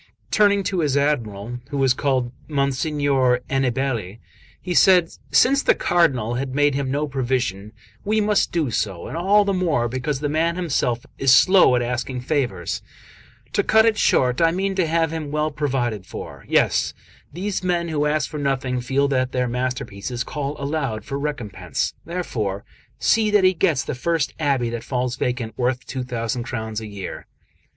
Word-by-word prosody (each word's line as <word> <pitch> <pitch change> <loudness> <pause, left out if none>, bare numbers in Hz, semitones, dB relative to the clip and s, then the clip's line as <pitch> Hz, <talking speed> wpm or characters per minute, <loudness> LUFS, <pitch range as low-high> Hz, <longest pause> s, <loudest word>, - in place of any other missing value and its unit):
Turning 200 -1 +4
to 190 -2 -1
his 145 -4 +1
Admiral, 120 -5 -1
who 140 - -3
was 135 -2 +3
called 130 -2 0 0.2
Monsignor 140 -2 +1
Aniballe, 130 -6 -1 0.4
he 180 - -4
said: 175 +2 +5 0.2
"Since 260 - +4
the - - +3
Cardinal 130 -10 +1
had 130 +1 -3
made 145 0 +3
him 135 -1 -2
no 145 +3 -1
provision, 125 -7 -2 0.3
we 215 +2 +1
must 210 -1 +2
do 155 -7 0
so, 95 -6 -2
and - - -6
all 200 +5 +3
the 200 - +1
more 165 -10 +1
because 130 +3 -2
the 145 - -1
man 160 +3 +1
himself 135 -9 -1
is 135 -1 +4
so 125 - +8
slow 185 -9 +5
at 120 - +1
asking 125 +1 -3
favours 125 - -2 0.7
to - - +3
cut 220 +2 +4
it 225 -1 +3
short, 125 - +2
I 165 - +5
mean 190 +3 -1
to 185 -3 +1
have 165 0 +1
him 160 -3 -4
well 150 +1 -1
provided 125 -9 -2
for; - - -9
yes, - - +2 0.4
these 190 +5 -3
men 175 -2 0
who 150 -2 0
ask 150 -1 0
for 150 - -6
nothing 130 -3 -1
feel 135 +3 +1
that 130 -1 0
their 125 -1 0
masterpieces 125 -2 -3
call 145 +1 -4
aloud 135 -7 -2
for 140 - -4
recompense; 105 - -3
therefore 110 - -3 0.3
see 220 -1 +2
that 205 -2 +4
he 185 0 +5
gets 160 -7 +1
the - - -4
first 150 +1 -1
abbey 135 -6 +1
that 120 -1 -5
falls 125 -1 -2
vacant 120 -4 -3
worth 125 0 0
two 130 -1 -4
thousand 120 -1 -3
crowns 110 -2 -4
a 110 - -7
year. 100 -2 -7
135 Hz, 175 wpm, -22 LUFS, 125-165 Hz, 0.7 s, so